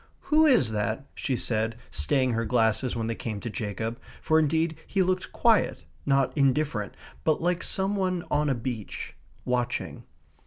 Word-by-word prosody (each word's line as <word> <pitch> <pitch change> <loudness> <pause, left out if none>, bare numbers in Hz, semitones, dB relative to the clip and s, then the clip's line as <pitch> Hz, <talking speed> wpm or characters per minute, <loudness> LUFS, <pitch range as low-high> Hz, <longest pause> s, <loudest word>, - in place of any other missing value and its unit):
"Who 315 +1 +7
is 145 - +4
that?" 110 +4 -2
she 135 - -2
said, 115 -1 -1 0.2
staying 130 - +1
her 115 0 0
glasses 115 +1 +1
when 115 -1 -2
they 115 - -1
came 110 -2 -4
to 115 - -4
Jacob, 110 +3 -4 0.2
for 160 0 +3
indeed 160 +1 +1
he 195 -1 +2
looked 185 0 -1
quiet, 230 -2 +2 0.2
not 135 -2 +2
indifferent, 135 -6 +1 0.3
but 155 - +2
like 175 +1 0
some 195 +1 -1
one 185 -3 0
on 150 0 +2
a 135 - +2
beach, 115 -3 -5 0.3
watching. 125 -1 -2
130 Hz, 160 wpm, -27 LUFS, 115-160 Hz, 0.3 s, Who